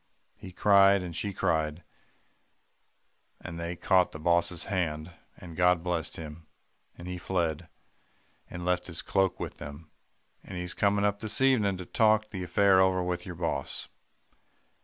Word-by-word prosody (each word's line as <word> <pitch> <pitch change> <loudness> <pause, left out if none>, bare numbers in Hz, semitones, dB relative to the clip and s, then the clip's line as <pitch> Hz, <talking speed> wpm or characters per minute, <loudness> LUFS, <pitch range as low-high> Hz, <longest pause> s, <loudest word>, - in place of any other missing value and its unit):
He 95 -2 -11
cried, 100 0 +5
and 85 -2 -6
she 95 +5 -2
cried; 80 -3 -1 1.6
and 85 0 -8
they 85 +1 -4
caught 90 +1 +2
the 75 - -7
boss's 85 +1 +1
hand, 80 -4 -2 0.3
and 85 -2 -11
God 90 0 +3
blessed 90 -3 -2
him; 80 0 -9 0.5
and 85 - -9
he 90 0 -5
fled, 85 -3 -2 0.8
and 85 0 -7
left 90 0 0
his 85 -2 -6
cloak 95 -2 +1
with - - -6
them; 75 +2 -9 0.5
and 95 - -8
he's 90 0 -4
coming 100 0 +2
up 100 0 0
this 105 0 -2
evening 115 -8 +3
to 90 - -7
talk 110 +1 +2
the 95 -4 -5
affair 95 +2 +4
over 95 -1 +2
with 90 0 -3
your 90 - -6
boss." 85 0 -3
90 Hz, 155 wpm, -29 LUFS, 85-100 Hz, 1.6 s, cried